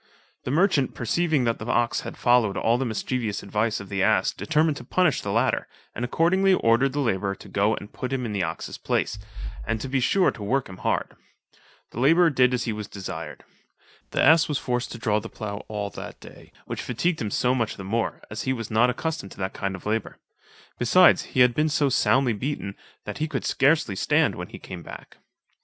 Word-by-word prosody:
The - - -2
merchant 150 -3 +2
perceiving 155 +3 +1
that 115 -1 0
the 105 - -7
ox 120 -1 +1
had - - -8
followed 120 -5 +3
all 115 +2 +2
the 135 - -1
mischievous 110 -1 -2
advice 105 +2 -1
of 100 - -9
the 95 0 -2
ass, - - +3
determined 155 -1 +1
to - - -8
punish 175 +4 +1
the 100 - -3
latter, 115 +5 +1 0.3
and 120 - -4
accordingly 185 +9 +3
ordered 130 0 +2
the 145 - -1
labourer 100 -7 0
to - - -14
go 100 +3 +1
and 105 - -10
put 125 - -5
him 130 -2 -1
in 110 - -3
the 100 - -1
ox's 80 -1 -4
place, - - -1 0.4
and 110 - -2
to 135 - -5
he 135 0 +1
sure 185 +9 +3
to - - -12
work 125 +6 0
him 95 - -10
hard. - - -1 0.8
The - - -6
labourer 165 +6 +5
did 130 -2 +4
as 125 -1 0
he 115 - -2
was 105 -1 -6
desired. 90 -6 -7 0.7
The - - 0
ass 160 -1 +6
was 150 - -1
forced 125 -1 -2
to - - -7
draw 110 -2 +1
the - - -8
plough 100 -1 -6
all 105 -1 -4
that - - -9
day, - - -14
which - - -5
fatigued 160 +8 -1
him 110 - -1
so 125 +5 +1
much 115 -4 -1
the 95 - -7
more, 115 +4 -2
as 110 - -4
he 130 - 0
was 115 -3 -6
not 115 +3 +4
accustomed 140 -4 -3
to - - -19
that 95 0 -3
kind 95 -1 -3
of 95 - -12
labour; 110 0 -2 0.6
besides 175 +10 +5
he - - +6
had 125 -1 +6
been 155 +4 +1
so 145 -1 +2
soundly 130 -1 +3
beaten, 105 -4 -4 0.3
that 105 +6 -6
he 155 - 0
could - - -3
scarcely 140 -7 +2
stand - - +2
when - - -6
he - - -10
came 90 -2 -9
back. - - -11
120 Hz, 220 wpm, -25 LUFS, 105-140 Hz, 0.8 s, ass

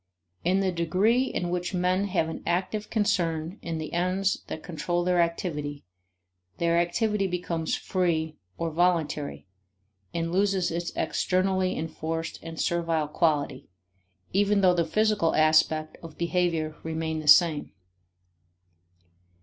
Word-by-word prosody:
In 185 +3 +2
the 190 -1 +1
degree 190 +9 +2
in 175 -8 -3
which 180 +1 -2
men 180 +2 +1
have 185 -5 0
an 160 - -6
active 195 +4 -1
concern 175 -4 0
in 165 -1 -4
the 155 -1 -6
ends 185 +3 0
that 160 - -6
control 175 +1 -2
their 180 -1 +3
activity, 150 -4 -2 0.7
their 170 0 +2
activity 195 +4 +1
becomes 170 -3 -2
free 160 -4 -1 0.2
or 165 -1 -2
voluntary 160 -4 0 0.7
and 165 0 -2
loses 195 -1 +1
its 170 +1 -3
externally 185 0 0
enforced 160 +1 -4
and 165 -1 -8
servile 165 -3 0
quality, 150 -5 0 0.6
even 200 +1 +3
though 185 -2 +5
the 170 -2 +1
physical 210 -1 +2
aspect 155 0 +3
of 165 -2 -11
behavior 170 -3 0
remain 160 0 -3
the 155 - -7
same. 150 0 +5
170 Hz, 125 wpm, -27 LUFS, 160-185 Hz, 0.7 s, though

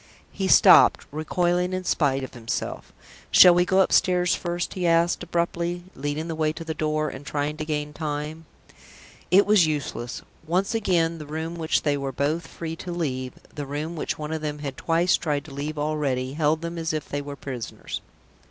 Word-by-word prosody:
He 190 - -2
stopped, - - +7
recoiling 175 +4 0
in 185 0 -2
spite 140 -6 +1
of 130 - -7
himself. 120 -2 -4 0.4
"Shall 180 - +9
we 175 +1 +3
go 190 +1 +4
upstairs 180 -1 +3
first?" 175 0 -3
he 180 -2 -1
asked, 170 +1 +3
abruptly, 170 0 -2
leading 145 +3 -3
the 165 - -3
way 155 -1 0
to 165 - -7
the 160 -1 -3
door, 155 0 -1
and 130 +1 -9
trying 145 +1 -2
to 155 - -4
gain 150 -1 -3
time. 150 +1 -4 0.8
It 195 +3 +6
was 205 -5 +5
useless. 140 -5 -4 0.2
Once 185 +6 +1
again, 170 -7 +1
the 150 - -8
room 160 +2 -4
which 160 -2 0
they 145 -2 +1
were 135 -1 -3
both 145 +6 -1
free 165 -1 -6
to 180 - -6
leave, 130 -7 -3 0.2
the 145 -2 -5
room 150 +4 -4
which 155 - -3
one 150 0 -5
of 160 - -3
them 150 -1 -3
had 140 -3 -5
twice 170 +4 +2
tried 150 -4 -2
to 150 - -11
leave 150 +2 -4
already, 145 -4 -1
held 155 +1 +1
them 170 0 -4
as 160 -1 -2
if 155 -1 -3
they 145 - -3
were 145 0 -7
prisoners. 130 -4 -6
155 Hz, 190 wpm, -25 LUFS, 145-170 Hz, 0.8 s, Shall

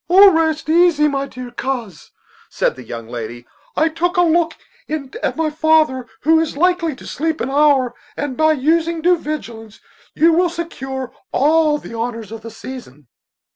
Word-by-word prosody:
"Oh, 390 +2 +8
rest 320 -2 0
easy, 325 -2 +4
my 275 -1 -1
dear 250 -2 -9
coz," 240 - -5 0.4
said - - 0
the 130 - -10
young 115 0 -7
lady; 120 0 -7 0.3
"I 315 - +3
took 345 +3 -1
a 355 - +5
look 330 -1 +2 0.3
in 295 -4 -5
at - - -1
my 320 -1 0
father, 310 -5 +2
who 320 +2 +4
is 320 -3 -2
likely 350 -2 +1
to - - -14
sleep 315 +2 -2
an 260 - -2
hour; 280 -3 +3 0.2
and 290 -3 -3
by 315 +2 +3
using 325 +3 0
due 355 0 +4
vigilance 230 -9 -6 0.4
you 330 +1 +4
will 350 +2 +3
secure 270 -6 -5 0.2
all 305 +1 +3
the 260 - -10
honors 230 -2 -4
of 225 -1 -7
the 230 - -8
season." 220 - -10
300 Hz, 175 wpm, -19 LUFS, 245-325 Hz, 0.4 s, Oh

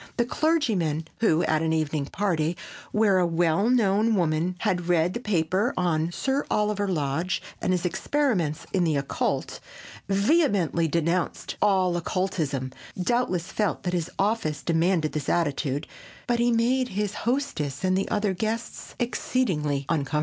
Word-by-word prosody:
The 240 - +2
clergyman 220 - +1
who, 175 -7 +3
at 155 0 +1
an 160 0 +1
evening 155 -2 -1
party 170 -4 -1 0.3
where 210 -3 +3
a 175 - +3
well 170 +5 +2
known 220 -2 +3
woman 170 0 +1
had 180 -1 0
read 175 0 +2
a - - -6
paper 200 - 0
on 170 -2 +1
Sir 270 +9 -1
Oliver 210 -1 +1
Lodge 160 +1 -1 0.2
and - - 0
his 180 -1 0
experiments 185 - 0
in 185 -2 +2
the 160 -3 +1
occult, 140 -1 -2 0.5
vehemently 200 - +2
denounced 170 +2 -1
all 190 -4 +3
occultism, 160 -7 -2 0.3
doubtless 185 -4 0
felt 210 -3 -1
that 180 - -2
his 170 -3 -1
office 195 -8 0
demanded 165 -1 +1
this 150 -3 -3
attitude, 145 -4 0 0.4
but 240 -1 0
he 240 0 +3
made 245 +3 +2
his 205 -1 -2 0.2
hostess 165 - -2
and 185 0 +2
the 195 - -1
other 205 -2 +1
guests 220 +5 -4
exceedingly 170 - 0
uncomfortable. 150 -2 0
180 Hz, 145 wpm, -26 LUFS, 160-210 Hz, 0.5 s, who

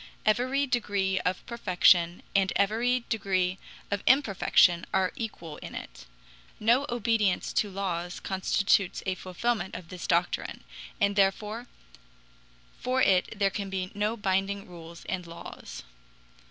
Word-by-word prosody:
Every 255 +6 +2
degree 200 -7 0
of 180 - -2
perfection 180 -6 +3
and 195 -1 +3
every 235 +5 +1
degree 190 -4 0 0.3
of 200 0 0
imperfection 200 -8 +4
are 185 -1 +1
equal 170 -9 -6
in - - -9
it; - - -9 0.5
no 240 +6 +3
obedience 225 -5 +1
to 210 - +1
laws 180 -3 -3
constitutes 195 0 +1
a 190 - +1
fulfillment 190 +2 -2
of 170 - -8
this 180 -1 -6
doctrine, 175 +1 0 0.4
and 200 -1 +2
therefore 210 +4 +1 1.1
for 255 +1 0
it 190 +3 +2
there 200 -1 +2
can 200 0 -4
be 185 -1 -3
no 210 +3 -1
binding 195 0 -1
rules 170 -1 -11
and 180 -2 -4
laws. 170 0 -9
195 Hz, 125 wpm, -28 LUFS, 185-225 Hz, 1.1 s, imperfection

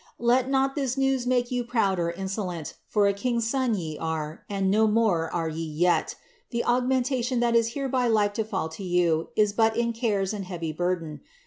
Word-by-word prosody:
Let 245 +2 +2
not 270 0 +2
this 270 -3 -2
news* 270 -2 +1
make 245 -1 +1
you 245 -1 0
proud 225 -6 +1
or 170 0 0
insolent, 185 -2 -4
for 210 -2 +2
a 200 - +3
king's 235 +2 -1
son 255 -2 +1
ye 160 -5 -5
were, 160 -1 -4
and 195 -1 0
BO 220 +2 +4
more 210 -7 +2
are 165 -2 -1
yon 160 -1 -5
jret; 175 0 +2 0.3
the 235 -1 -2
augmentation 250 0 +1
that 235 -1 +2
is 230 0 +2
hereby 260 -3 0
like 210 -3 +2
to 220 - -1
fidl 190 -7 -3
to 195 - -8
yon 175 -3 +1
is 210 -1 +3
ba* 225 +1 +3
is 235 -1 0
cares 210 -4 0
and 200 -2 -4
heavy 170 -4 -4
burden. 170 -2 -2
215 Hz, 200 wpm, -26 LUFS, 175-245 Hz, 0.3 s, BO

